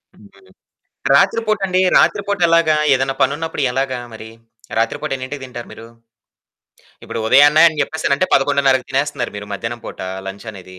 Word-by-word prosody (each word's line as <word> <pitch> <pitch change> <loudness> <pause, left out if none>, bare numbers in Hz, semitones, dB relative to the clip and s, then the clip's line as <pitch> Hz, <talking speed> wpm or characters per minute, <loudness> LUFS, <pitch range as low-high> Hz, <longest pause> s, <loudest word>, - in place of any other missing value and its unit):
హుహు. 95 -2 -20 0.7
రాత్రి 230 - +3
పూట 215 -1 +1
అండి. 185 0 +1 0.2
రాత్రి 200 - +3
పూట 205 - -1
ఎలాగా 165 -2 +3 0.2
ఏదైనా 135 +1 0
పనున్నపుడు 150 +2 -1
ఎలాగా 130 -1 -2
మరి 110 0 -10 0.5
రాత్రి 115 0 0
పూట 155 -2 -4
ఎన్నింటికి 130 +1 -7
తింటారు 120 -2 -9
మీరు. 115 +1 -11 1.2
ఇప్పుడు 115 - -5
ఉదయానే 145 +6 +6
అని 155 -1 -9
చెప్పేసనంటే 155 +2 0
11:30కి 135 -2 +2
తినేస్తున్నారు 135 -2 -2
మీరు 100 0 -7
మధ్యాహ్నం 115 +4 -5
పూట - - -9 0.3
లంచనేది. 95 -2 -10
135 Hz, 145 wpm, -18 LUFS, 115-155 Hz, 1.2 s, ఉదయానే